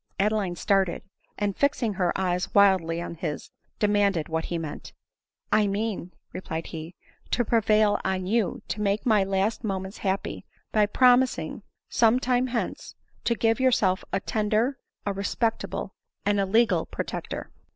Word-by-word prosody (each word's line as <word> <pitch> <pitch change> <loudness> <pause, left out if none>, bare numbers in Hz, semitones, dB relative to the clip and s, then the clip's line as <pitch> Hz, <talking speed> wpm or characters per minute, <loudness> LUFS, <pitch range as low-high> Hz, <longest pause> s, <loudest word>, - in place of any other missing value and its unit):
Adeline 205 -3 +1
started, 195 -1 +1 0.3
and 205 -2 -1
fixing 270 -6 +1
her 180 -2 +1
eyes 180 -1 0
wildly 190 -5 +4
on 170 - -5
his, 155 -2 -5 0.3
demanded 205 -5 +2
what 160 0 -2
be 170 - -1
meant. 160 -3 -6 0.3
" - - -51
I 205 - +2
mean," 200 -3 -2 0.2
replied 165 -3 -4
he, 160 +1 -7 0.2
" - - -32
to 245 - +1
prevail 215 -2 +3
on 185 -1 -1
you 210 -1 0
to 210 - -3
make 205 +3 0
my 215 -5 +4
last 195 +4 0
moments 190 -2 -4
happy, 195 -1 -2 0.3
by 210 -1 +3
promising, 255 +2 +3 0.3
some 230 +1 +3
time 255 0 +1
hence, 240 -2 -4 0.3
to 235 - +2
give 225 0 +2
yourself 215 -8 +2
a 195 - +1
tender, 220 +6 0 0.3
a 200 - 0
respectable, 220 +3 -2 0.3
and 205 0 +2
a 195 - +1
legal 225 +4 +3
pro - - -4
tector." - - -5
205 Hz, 155 wpm, -26 LUFS, 190-225 Hz, 0.3 s, wildly